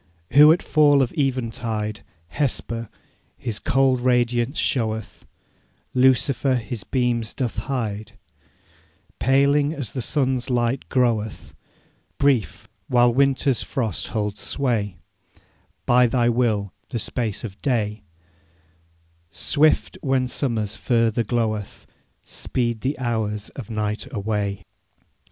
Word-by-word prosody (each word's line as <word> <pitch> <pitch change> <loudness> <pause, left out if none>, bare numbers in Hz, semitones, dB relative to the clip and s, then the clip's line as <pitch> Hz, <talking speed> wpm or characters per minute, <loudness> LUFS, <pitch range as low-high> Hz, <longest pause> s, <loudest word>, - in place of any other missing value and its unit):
'Who 150 +2 +8
at 170 - +2
fall 145 -3 +4
of 125 - -3
eventide, 115 -6 -2 0.3
Hesper, 115 -5 -2 0.5
his 110 -3 -4
cold 130 -1 +2
radiance 125 +1 +1
showeth, 110 -6 -1 0.7
Lucifer 130 +1 +3
his 120 -3 -4
beams 120 0 -1
doth 120 -5 -2
hide, 110 -5 -3 1.1
Paling 140 +3 +3
as 135 -9 -4
the 130 - -3
sun's 130 -1 0
light 120 +1 0
groweth, 115 -4 0 0.6
Brief, 135 -7 +1 0.2
while 120 -1 +4
winter's 135 -1 +2
frost 115 - -3
holds 105 -2 -3
sway, 110 -9 -1 0.9
By 125 0 +5
thy 120 0 +2
will 110 -5 0 0.2
the - - -3
space 110 -1 -2
of 105 -3 -8
day; 110 -5 -1 1.3
Swift, 155 - +1
when 135 -2 +1
summer's 115 -6 -2
fervour 115 -1 +1
gloweth, 110 -2 -2 0.4
Speed 120 -3 -2
the 135 +3 -1
hours 110 -4 -2
of 125 -7 -9
night 110 +4 -3
away. 100 -3 -2
120 Hz, 105 wpm, -23 LUFS, 110-130 Hz, 1.3 s, Who